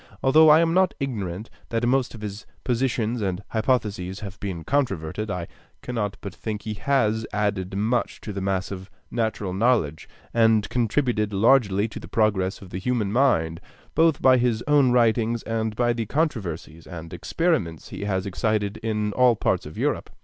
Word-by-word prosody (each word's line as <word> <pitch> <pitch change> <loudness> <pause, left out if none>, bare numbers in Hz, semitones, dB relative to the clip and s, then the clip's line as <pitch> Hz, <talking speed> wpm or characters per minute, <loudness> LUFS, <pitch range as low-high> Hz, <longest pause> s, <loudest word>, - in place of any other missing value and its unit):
Although 155 +4 +6
I 155 +2 +7
am 165 0 +2
not 185 +1 +3
ignorant 105 - -4 0.2
that 115 +1 0
most 130 -1 +1
of 110 - -10
his 105 0 -7 0.2
positions 120 -2 0
and 95 -1 -2
hypotheses 105 -5 -1
have 100 -2 -8
been 90 -5 -4
controverted, 105 - -1
I 90 -3 -3 0.4
cannot 105 -5 -3
but 100 -3 -6
think 105 +1 -5
he 110 - -3
has 110 -2 +1
added 100 -2 -1
much 115 +4 0
to 105 - -6
the 100 - -4
mass 95 0 -1
of 95 0 -7 0.2
natural 110 -5 -2
knowledge, 95 - +1 0.2
and 115 -2 +4
contributed 115 -3 0
largely 105 -1 +3
to 110 - -8
the - - -10
progress 100 -4 0
of 90 - -13
the 95 - -4
human 110 -2 -1
mind, 85 -10 +2 0.3
both 160 -2 +3
by 130 -1 +7
his 120 -2 +1
own 145 -4 +4
writings 115 -1 +2
and 110 -1 -2
by 120 +1 +2
the 115 -2 -3
controversies 95 - -3
and 80 -2 -8
experiments 90 - -1
he 100 - -6
has 95 -1 -1
excited 105 +1 -1
in 105 -2 -2
all 125 0 +4
parts - - 0
of - - -11
Europe. - - -1
110 Hz, 170 wpm, -24 LUFS, 95-125 Hz, 0.4 s, I